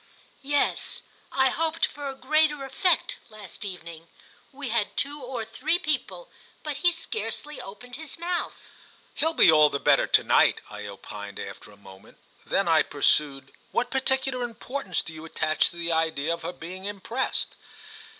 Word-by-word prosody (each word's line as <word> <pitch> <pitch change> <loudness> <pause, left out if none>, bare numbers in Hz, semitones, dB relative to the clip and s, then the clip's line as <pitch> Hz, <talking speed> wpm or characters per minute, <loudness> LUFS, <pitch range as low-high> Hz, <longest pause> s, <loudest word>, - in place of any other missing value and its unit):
"Yes; 285 +1 0 0.3
I 265 0 +4
hoped 325 +3 +1
for 285 -1 -6
a 270 - -6
greater 295 +1 +2
effect 340 +6 +1
last 210 -3 -10
evening. 170 -4 -7 0.4
We 275 -1 -5
had 220 -2 0
two 290 +1 0
or 250 -3 -4
three 235 +9 +1
people, 310 - -2 0.3
but 300 -2 -3
he 350 +4 +4
scarcely 315 -5 -4
opened 245 +6 -8
his 315 -2 -7
mouth." 345 +1 -2 0.5
"He'll 320 0 +1
be - - +8
all 155 -1 +7
the 140 - -2
better - - +4
to - - +5
night," - - +5
I 105 0 -6
opined 100 0 -8
after - - -8
a 105 - -16
moment. 95 -1 -15 0.3
Then - - +2
I - - +6
pursued: 135 -3 +1 0.2
"What 245 +1 0
particular 265 -1 0
importance 240 -3 -3
do 160 - -8
you 155 0 -9
attach 160 -1 +1
to - - -12
the 170 0 -1
idea 160 -1 +1
of 170 - -5
her - - -3
being 185 +4 -8
impressed?" 205 +6 -2
240 Hz, 160 wpm, -27 LUFS, -, 0.5 s, be